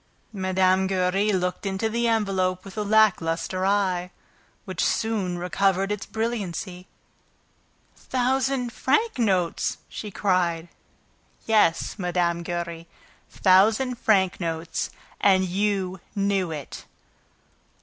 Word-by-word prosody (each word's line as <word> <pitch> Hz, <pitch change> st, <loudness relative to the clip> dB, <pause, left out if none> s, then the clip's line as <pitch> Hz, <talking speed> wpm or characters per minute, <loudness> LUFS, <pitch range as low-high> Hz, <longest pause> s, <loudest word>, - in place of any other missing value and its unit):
Mine. 190 Hz, -1 st, +2 dB
Giry 190 Hz, +2 st, +1 dB
looked 180 Hz, -2 st, -1 dB
into 195 Hz, +2 st, -1 dB
the 235 Hz, +2 st, 0 dB
envelope 190 Hz, -5 st, 0 dB
with 195 Hz, -, -10 dB
a 215 Hz, -, -2 dB
lackluster 190 Hz, -4 st, +2 dB
eye, 185 Hz, -3 st, +1 dB, 0.6 s
which 185 Hz, -3 st, -2 dB
soon 205 Hz, -6 st, 0 dB
recovered 195 Hz, +2 st, +1 dB
its 210 Hz, 0 st, -4 dB
brilliancy. 195 Hz, -5 st, -4 dB, 1.1 s
"Thousand 260 Hz, -1 st, -1 dB
franc 290 Hz, -, +1 dB
notes!" 185 Hz, -7 st, +1 dB
she 210 Hz, -, -7 dB
cried. 175 Hz, -4 st, 0 dB, 0.8 s
"Yes, 215 Hz, -3 st, +2 dB
Mme. 175 Hz, -2 st, 0 dB
Giry, 170 Hz, -1 st, -5 dB, 0.4 s
thousand 220 Hz, +7 st, +3 dB
franc 190 Hz, -4 st, +2 dB
notes! 165 Hz, -1 st, -3 dB, 0.3 s
And 190 Hz, -2 st, +4 dB
you 190 Hz, 0 st, -1 dB, 0.2 s
knew 195 Hz, -3 st, +1 dB
it!" 150 Hz, -3 st, -7 dB
190 Hz, 100 wpm, -25 LUFS, 180-215 Hz, 1.1 s, And